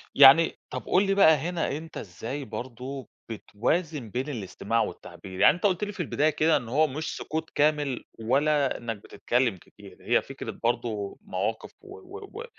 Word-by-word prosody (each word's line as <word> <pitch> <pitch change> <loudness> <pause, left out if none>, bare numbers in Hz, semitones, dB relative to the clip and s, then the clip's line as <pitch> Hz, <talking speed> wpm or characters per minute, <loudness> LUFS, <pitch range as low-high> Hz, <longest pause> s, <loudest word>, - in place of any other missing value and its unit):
يعني 140 +4 +8
طَب - - -5
قُل 185 - +4
لي 195 - +2
بقى 175 -5 +7
هنا 165 -1 -2
أنت 160 +1 -9
إزاي 115 +9 -6
برضو 125 +3 -7 0.2
بتوازن 125 - -2
بين 130 +7 -3
الاستماع 115 -1 -2
والتعبير؟ 95 -3 -7
يعني - - +7
أنت 175 - -12
قُلت 195 -1 +2
لي 205 - -5
في - - -14
البداية 155 -2 +1
كده 155 +1 +3
إن 120 -5 -6
هو 155 +6 +3
مش 150 +3 -4
سقوط 160 +1 -4
كامل 145 -3 +1 0.2
ولا 140 +5 +2
إنك 115 -2 -4
بتتكلم 120 +1 -1
كتير، - - -16
هي - - +2
فكرة - - -7
برضو 115 -4 -1
مواقف 100 +4 -3
و 400 0 -11
و 395 +1 -10 0.2
و - - -6
140 Hz, 170 wpm, -27 LUFS, 115-160 Hz, 0.2 s, يعني